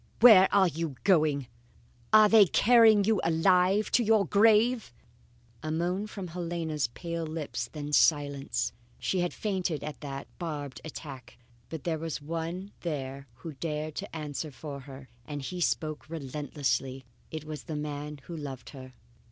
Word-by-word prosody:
"Where 210 Hz, -5 st, +8 dB
are 195 Hz, -2 st, +5 dB
you 165 Hz, -3 st, -3 dB
going? 155 Hz, -7 st, +3 dB, 0.7 s
Are 215 Hz, 0 st, +8 dB
they 210 Hz, -2 st, +7 dB
carrying 220 Hz, 0 st, +6 dB
you 215 Hz, 0 st, +2 dB
alive 180 Hz, +5 st, +3 dB
to 245 Hz, -, +4 dB
your 215 Hz, -2 st, +4 dB
grave?" 220 Hz, -, +3 dB, 0.7 s
A 155 Hz, -, -4 dB
moan 180 Hz, +6 st, -1 dB
from 195 Hz, -4 st, -7 dB
Helena's 165 Hz, -5 st, -2 dB
pale 170 Hz, +7 st, -5 dB
lips, 155 Hz, -2 st, -4 dB
then 150 Hz, -1 st, -6 dB
silence. 140 Hz, -, +2 dB, 0.2 s
She 185 Hz, -, -1 dB
had 175 Hz, 0 st, 0 dB
fainted 185 Hz, -7 st, -2 dB
at 150 Hz, 0 st, -7 dB
that 140 Hz, -2 st, -6 dB
barbed 150 Hz, -6 st, -5 dB
attack. 140 Hz, -4 st, -9 dB, 0.3 s
But 160 Hz, -2 st, -6 dB
there 160 Hz, -2 st, -1 dB
was 165 Hz, -1 st, -4 dB
one 165 Hz, +5 st, -5 dB
there 140 Hz, -4 st, -5 dB, 0.2 s
who 160 Hz, -, -5 dB
dared 155 Hz, +1 st, -4 dB
to 200 Hz, -3 st, -6 dB
answer 150 Hz, 0 st, -4 dB
for 140 Hz, +2 st, -8 dB
her 135 Hz, 0 st, -11 dB, 0.2 s
and 145 Hz, +3 st, -6 dB
he 180 Hz, +6 st, -5 dB
spoke 155 Hz, -2 st, -1 dB
relentlessly. 140 Hz, -3 st, -3 dB, 0.2 s
It 155 Hz, -1 st, -6 dB
was 155 Hz, -2 st, -7 dB
the 155 Hz, -, -5 dB
man 150 Hz, -1 st, -5 dB
who 170 Hz, -, -8 dB
loved 140 Hz, -5 st, -7 dB
her. 130 Hz, -2 st, -11 dB
160 Hz, 150 wpm, -29 LUFS, 145-185 Hz, 0.7 s, Where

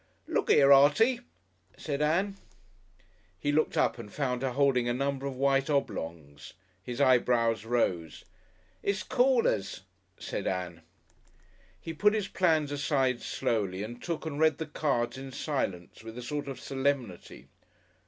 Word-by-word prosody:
"Look -, -, -1 dB
'ere, 140 Hz, 0 st, +7 dB
Artie!" 150 Hz, -, +5 dB, 0.6 s
said 145 Hz, -2 st, -3 dB
Ann. 180 Hz, +7 st, +1 dB, 1.0 s
He 145 Hz, +10 st, -1 dB
looked 155 Hz, +1 st, +1 dB
up -, -, +1 dB
and 105 Hz, -3 st, -9 dB
found 125 Hz, -4 st, -2 dB
her 130 Hz, -2 st, -1 dB
holding 130 Hz, -3 st, +2 dB
a 120 Hz, -, 0 dB
number 140 Hz, +1 st, -2 dB
of 135 Hz, -, -5 dB
white 135 Hz, +2 st, +1 dB
oblongs. 80 Hz, -, -3 dB, 0.3 s
His 120 Hz, +5 st, -6 dB
eyebrows 115 Hz, -4 st, +3 dB
rose. 90 Hz, -9 st, -1 dB, 0.6 s
"It's 200 Hz, -1 st, -1 dB
Callers," 250 Hz, -, +1 dB, 0.4 s
said -, -, -4 dB
Ann. 90 Hz, -3 st, -3 dB, 1.0 s
He 165 Hz, -, -6 dB
put 210 Hz, +6 st, +3 dB
his 210 Hz, -3 st, -1 dB
plans 160 Hz, -7 st, +1 dB
aside 135 Hz, -3 st, 0 dB
slowly 100 Hz, -4 st, -2 dB
and 120 Hz, +3 st, -8 dB
took 165 Hz, -2 st, -4 dB
and 150 Hz, -2 st, -4 dB
read 155 Hz, -2 st, +3 dB
the 160 Hz, -, -4 dB
cards 135 Hz, -5 st, -1 dB
in 135 Hz, 0 st, -8 dB
silence, 105 Hz, -, -4 dB
with 115 Hz, +1 st, -9 dB
a 125 Hz, -, -6 dB
sort 145 Hz, +2 st, -4 dB
of 135 Hz, -, -6 dB
solemnity. 135 Hz, -8 st, -3 dB
135 Hz, 145 wpm, -29 LUFS, 115-150 Hz, 1.0 s, ere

